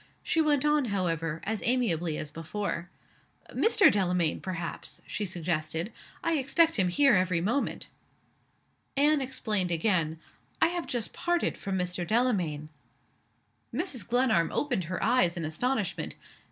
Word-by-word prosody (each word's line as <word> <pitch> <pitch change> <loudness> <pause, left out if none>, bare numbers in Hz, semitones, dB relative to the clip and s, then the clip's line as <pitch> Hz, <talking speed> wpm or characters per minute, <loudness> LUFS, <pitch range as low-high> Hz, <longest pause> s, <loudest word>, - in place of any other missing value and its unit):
She 325 - +2
went 295 -3 +2
on, 300 -2 +3
however, 165 -6 -1
as 215 +2 -2
amiably 175 -11 +1
as 150 - -5
before. 170 +2 -4 0.6
"Mr. 435 -3 +5
Delamayn, 180 -5 +1
perhaps?" 175 -3 -5
she 210 - -3
suggested. 170 0 -2 0.3
"I 330 -3 +2
expect 320 +4 +3
him 185 - +3
here 275 +10 +4
every 185 -2 +2
moment." 225 +11 -1 1.1
Anne 295 +1 +4
explained 215 -8 -1
again. 165 -2 +1 0.4
"I - - +4
have 350 0 -3
just 240 -4 -2
parted 345 0 0
from 195 -1 -3
Mr. 180 0 -2
Delamayn." 180 -11 0 1.0
Mrs. 270 - -2
Glenarm 235 -9 +2
opened 245 - -1
her 180 +3 -3
eyes 180 -9 +3
in 165 - -2
astonishment. 210 +6 -2
195 Hz, 130 wpm, -29 LUFS, 170-260 Hz, 1.1 s, Mr